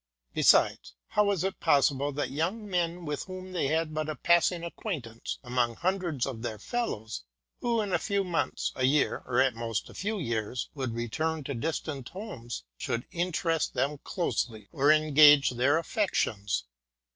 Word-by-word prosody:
Besides, - - +4
how 210 - +3
was 200 -4 +1
it 190 0 -2
possible 145 -2 +3
that 145 - -2
young 180 +10 -2
men, 175 -2 -1
with 150 -1 -3
whom 185 0 -8
they 175 -6 0
had 160 +1 0
but 155 0 -2
a 155 - -2
passing 170 +3 +3
acquaintance 145 - -5
among 120 -2 0
hundreds 175 -5 -1
of 125 -5 -5
their 110 -2 -4
fellows, 110 - -3 0.4
who 235 -2 +1
in 200 -3 -3
a - - +3
few 200 -1 0
months, 175 -3 -1
a 130 - +1
year, 140 +3 +2
or 125 0 +1
at 130 -1 +4
most 115 -1 -3
a - - -13
few 215 +2 -2
years, 120 - -2
would 130 -5 -3
return 155 +7 -2
to 140 - -4
distant 140 0 -3
homes, 130 - -7 0.2
should 120 +1 -2
interest 170 -2 0
them 140 +3 0
closely, 115 - -2
or 145 +2 +4
engage 150 -2 +7
their 130 +5 +3
affections 110 - 0
150 Hz, 165 wpm, -29 LUFS, 125-175 Hz, 0.4 s, engage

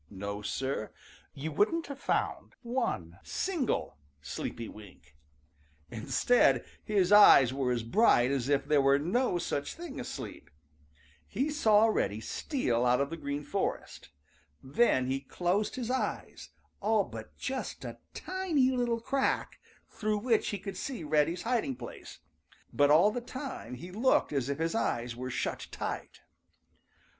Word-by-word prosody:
No, 100 +1 -5
Sir, 130 +1 -3 0.4
you 155 +3 -4
wouldn't 270 - +1
have 280 -1 -8
found - - -2
one 165 - -2
single 310 - -2 0.2
sleepy 75 +10 -5
wink! 90 -8 -14 0.8
Instead, 135 - +2 0.2
his 200 -4 +1
eyes 140 - +8
were 135 -2 0
as 120 -2 -1
bright 125 - +4
as 135 -1 -1
if 140 -1 +2
there 150 -2 +3
were 135 0 +5
no 180 - +1
such 145 -4 -3
thing 340 -4 -7
as - - -5
sleep. - - -7 0.8
He 270 +9 -1
saw 220 -7 +4
Reddy 105 - 0
steal 120 - -1
out 125 0 +3
of 140 +2 -1
the - - -3
Green 145 -2 -4
Forest. 195 +6 -3 0.5
Then 130 - +2
he 135 +1 -1
closed 180 +9 -1
his 250 -1 -3
eyes 260 - -3 0.3
all 215 0 +3
but 110 - -10
just 265 0 -4
a - - -7 0.2
tiny 345 -9 +1
little 240 -2 0
crack, 270 +3 -1 0.3
through 215 0 -2
which 225 +1 +1
he 205 - -2
could 195 -1 -7
see 250 -6 -5
Reddy's 155 +3 +1
hiding 230 - 0
place, 120 -1 -10 0.5
but 145 0 +4
all 165 +8 +6
the 245 - -3
time 260 - -7
he 175 +9 -9
looked 225 - +2
as 135 -2 -1
if 140 - -1
his 165 +1 -1
eyes 120 - -1
were 130 +1 -5
shut - - -3
tight. - - -5
165 Hz, 150 wpm, -30 LUFS, -, 0.8 s, eyes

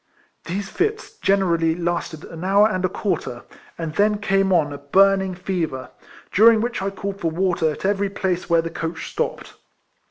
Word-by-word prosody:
These 195 +4 -3
fits 430 +4 -2
generally 170 -5 +2
lasted 170 -2 -3
an 165 +1 -9
hour 200 +3 +5
and 185 -4 -2
a 185 - +2
quarter, 170 - -3 0.3
and 165 -2 -4
then 210 +3 +2
came 195 -1 +1
on 155 -5 +2
a 140 - -7
burning 190 +5 +3
fever, 175 -8 -3 0.4
during 225 +2 +6
which 235 -2 -2
I 195 - -1
called 195 0 -5
for 165 - +1
water 170 -1 +1
at 155 - -5
every 200 0 +1
place 190 -3 -2
where 165 -1 +4
the 165 - -5
coach 165 0 -5
stopped. - - -3
185 Hz, 170 wpm, -22 LUFS, 165-200 Hz, 0.4 s, during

